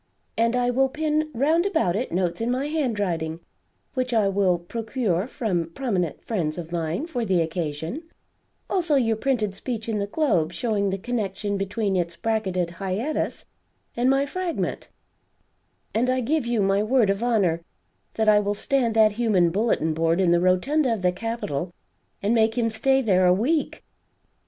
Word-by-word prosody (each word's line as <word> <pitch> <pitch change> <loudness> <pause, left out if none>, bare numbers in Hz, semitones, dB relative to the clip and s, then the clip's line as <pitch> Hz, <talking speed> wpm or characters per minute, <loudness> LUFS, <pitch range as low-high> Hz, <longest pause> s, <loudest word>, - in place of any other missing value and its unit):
And 230 +1 +2
I 245 0 +2
will 265 +2 +2
pin 310 +1 0
round 305 +7 +2
about 320 - +1
it 245 +5 -2
notes 175 +1 -1
in 230 - 0
my 255 +3 0
handwriting, 205 - -1 0.5
which 255 -2 -1
I 210 -3 +3
will 195 -2 +2
procure 220 +1 -2
from 180 -10 -2
prominent 190 - -2
friends 170 -8 -2
of 170 -1 -7
mine 170 - -2
for 255 -8 -3
the 190 -5 +2
occasion; 165 - -3 0.7
also 345 -6 +1
your 230 -5 +2
printed 220 -4 0
speech 225 +2 -5
in 220 -2 -1
the 200 - -2
Globe, 180 - +1
showing 205 -3 0
the 195 - -1
connection 205 -2 -2
between 200 +1 -1
its 170 -2 -1
bracketed 190 -6 -1
hiatus 195 - -3 0.5
and 245 +2 +2
my 270 +1 +3
Fragment; 355 +3 -3 1.0
and 240 +4 +1
I 255 0 +2
give 265 +1 0
you 235 -4 +1
my 195 +1 +2
word 220 -2 +3
of 200 +2 -3
honor 200 -9 +1 0.5
that 220 -1 0
I 210 -1 +6
will 205 0 -1
stand 235 0 0
that 215 -1 +6
human 205 -6 +2
bulletin 190 -5 +1
board 165 +2 +1
in 180 -3 +3
the 170 0 +3
rotunda 245 +11 +2
of 195 - -8
the 180 - +4
capitol 180 -6 -3 0.5
and 205 +3 +2
make 225 0 +2
him 230 -2 +1
stay 265 +4 +2
there 185 -4 +3
a 180 - +6
week! 290 - -1
215 Hz, 170 wpm, -24 LUFS, 185-250 Hz, 1.0 s, I